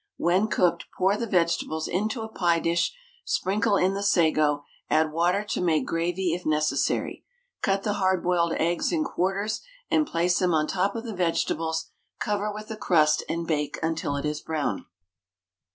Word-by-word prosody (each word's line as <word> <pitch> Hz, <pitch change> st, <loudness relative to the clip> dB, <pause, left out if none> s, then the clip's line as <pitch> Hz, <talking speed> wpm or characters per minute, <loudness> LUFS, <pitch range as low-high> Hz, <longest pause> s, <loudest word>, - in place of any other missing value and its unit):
When 185 Hz, +5 st, +2 dB
cooked, 175 Hz, -5 st, +1 dB
pour 190 Hz, +2 st, +3 dB
the 230 Hz, +2 st, -3 dB
vegetables 170 Hz, -4 st, 0 dB
into 215 Hz, +6 st, -1 dB
a -, -, -5 dB
pie 175 Hz, -6 st, +1 dB
dish, 170 Hz, +1 st, +1 dB, 0.3 s
sprinkle 200 Hz, +2 st, +1 dB
in 185 Hz, +1 st, +2 dB
the 200 Hz, -, -3 dB
sago, 155 Hz, -6 st, +2 dB, 0.3 s
add 155 Hz, 0 st, +2 dB
water 175 Hz, +5 st, +1 dB
to 210 Hz, -, -3 dB
make 165 Hz, -3 st, +2 dB
gravy 175 Hz, +1 st, -1 dB
if 175 Hz, +1 st, -4 dB
necessary. 155 Hz, 0 st, 0 dB, 0.4 s
Cut 195 Hz, -1 st, +1 dB
the 210 Hz, -, 0 dB
hard 185 Hz, -1 st, +2 dB
boiled 170 Hz, -2 st, +2 dB
eggs 170 Hz, +1 st, 0 dB
in 325 Hz, -3 st, +1 dB
quarters 200 Hz, -, -1 dB, 0.3 s
and 310 Hz, -1 st, +3 dB
place 175 Hz, -1 st, +1 dB
them 180 Hz, -3 st, +2 dB
on 155 Hz, -1 st, +2 dB
the -, -, -4 dB
top 195 Hz, +2 st, 0 dB
of 230 Hz, -, -4 dB
the 230 Hz, -3 st, -5 dB
vegetables, 165 Hz, -2 st, -1 dB, 0.3 s
cover 210 Hz, 0 st, -1 dB
with 215 Hz, +1 st, -8 dB
a 220 Hz, -, -5 dB
crust, 155 Hz, -6 st, +3 dB
and 170 Hz, 0 st, -2 dB
bake 150 Hz, -3 st, -1 dB
until 160 Hz, -3 st, -1 dB
it 140 Hz, -, -3 dB
is 150 Hz, 0 st, -2 dB
brown. 150 Hz, -11 st, -2 dB
175 Hz, 175 wpm, -26 LUFS, 160-200 Hz, 0.4 s, pour